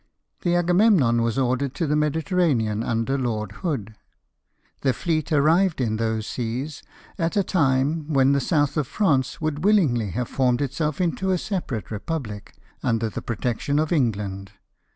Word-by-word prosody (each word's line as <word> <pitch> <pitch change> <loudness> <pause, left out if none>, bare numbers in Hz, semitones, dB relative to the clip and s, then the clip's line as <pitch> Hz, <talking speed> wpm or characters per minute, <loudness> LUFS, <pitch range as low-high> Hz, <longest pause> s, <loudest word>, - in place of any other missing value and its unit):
The 175 -1 +1
Agamemnon 175 - +4
was 115 0 0
ordered 130 +1 0
to 170 - -1
the 150 - 0
Mediter 150 +5 0
ranean, 115 -11 +2
under 115 +4 -1
Lord 110 -5 -2
Hood. 115 - -3 0.9
The 135 -2 +2
fleet 160 -1 -2
arrived 160 +4 +3
in 110 -4 0
those 110 -1 -1
seas 125 +6 -4 0.4
at 170 +4 0
a 200 - +4
time 150 -1 +1
when 135 -1 +4
the 140 - +3
South 145 +1 +1
of 150 -4 0
France 140 -11 +1
would 155 0 -2
willingly 150 - +3
have 120 +5 -3
formed 125 -2 +1
itself 145 +2 -2
into 180 +2 0
a 185 - +2
separate 150 - -4
republic, 105 -3 -5 0.3
under 115 -1 0
the - - -5
protection 120 +5 -2
of 155 0 +1
England. 100 - -1
140 Hz, 155 wpm, -24 LUFS, 115-160 Hz, 0.9 s, Agamemnon